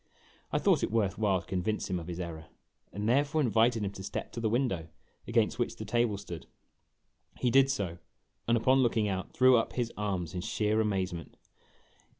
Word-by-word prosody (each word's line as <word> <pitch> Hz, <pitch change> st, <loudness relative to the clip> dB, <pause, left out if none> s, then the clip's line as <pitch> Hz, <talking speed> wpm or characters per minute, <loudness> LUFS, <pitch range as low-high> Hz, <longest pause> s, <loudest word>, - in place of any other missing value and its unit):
I -, -, +1 dB
thought -, -, +3 dB
it -, -, 0 dB
worth 105 Hz, -3 st, 0 dB
while 100 Hz, -4 st, +2 dB
to -, -, -18 dB
convince 95 Hz, +5 st, -2 dB
him 90 Hz, -2 st, -1 dB
of 85 Hz, -, -9 dB
his 90 Hz, 0 st, -5 dB
error, 80 Hz, -3 st, -6 dB, 0.4 s
and 100 Hz, +3 st, -3 dB
there 130 Hz, +5 st, +4 dB
fore 145 Hz, +2 st, -2 dB
invited 115 Hz, -3 st, +3 dB
him 100 Hz, -, -2 dB
to 95 Hz, -, -9 dB
step 95 Hz, -, -5 dB
to -, -, -6 dB
the 115 Hz, -1 st, 0 dB
window, 105 Hz, -9 st, 0 dB, 0.4 s
against 115 Hz, 0 st, +1 dB
which 120 Hz, -1 st, -1 dB
the 110 Hz, -, -7 dB
table 115 Hz, -1 st, +1 dB
stood. 85 Hz, -7 st, -8 dB, 0.9 s
He 125 Hz, -, +1 dB
did 135 Hz, +2 st, +5 dB
so, 95 Hz, -11 st, -2 dB, 0.5 s
and, 115 Hz, +1 st, +4 dB
upon 130 Hz, +4 st, +4 dB
looking 115 Hz, -3 st, +2 dB
out, 95 Hz, -1 st, -3 dB
threw 130 Hz, 0 st, +5 dB
up 115 Hz, -, -1 dB
his 120 Hz, -2 st, -2 dB
arms 95 Hz, -6 st, -2 dB
in 90 Hz, -, -3 dB
sheer 110 Hz, +1 st, +1 dB
amazement. 95 Hz, -5 st, -2 dB
105 Hz, 195 wpm, -30 LUFS, 95-120 Hz, 0.9 s, did